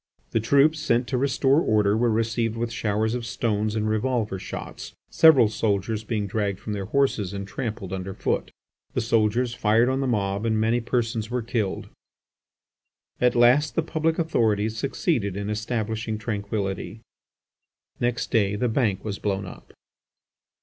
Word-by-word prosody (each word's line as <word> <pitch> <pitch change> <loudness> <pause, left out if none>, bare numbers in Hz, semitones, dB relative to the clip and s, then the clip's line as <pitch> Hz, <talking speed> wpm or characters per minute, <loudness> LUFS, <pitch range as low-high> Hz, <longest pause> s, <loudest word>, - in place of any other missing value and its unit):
The 115 - +2
troops 140 +7 +3
sent 120 -5 +1
to 130 - 0
restore 135 +2 +3
order 105 -4 +2
were 120 +2 +2
received 115 0 0
with 115 0 -2
showers 110 0 0
of 125 -1 -3
stones 110 -2 -1
and 110 -1 0
revolver 110 -2 -1
shots; - - -7 0.2
several 145 -8 +7
soldiers 105 0 -1
being 110 -2 -2
dragged 100 -1 -2
from 105 - -5
their 100 -2 -3
horses 110 -5 0
and 100 0 -5
trampled 105 -3 -5
underfoot. 95 0 -2 0.5
The - - +1
soldiers 115 +2 +1
fired 115 0 +3
on 130 +1 0
the 135 - 0
mob 100 -3 -1
and 110 -1 +1
many 115 +2 +2
persons 115 -2 -1
were 125 -1 -2
killed. 110 -4 -2 1.3
At 125 0 +3
last 125 +5 +4
the 165 - +1
public 160 0 0
authorities 110 -9 +1
succeeded 110 - -1
in 100 +1 -3
establishing 110 0 -2
tranquillity. 100 0 -4 1.0
Next 120 -1 -1
day 105 -4 +2
the 120 +4 0
Bank 110 -5 0
was 100 -2 -4
blown 100 -1 -2
up. 90 - -12
110 Hz, 150 wpm, -25 LUFS, 105-120 Hz, 1.3 s, several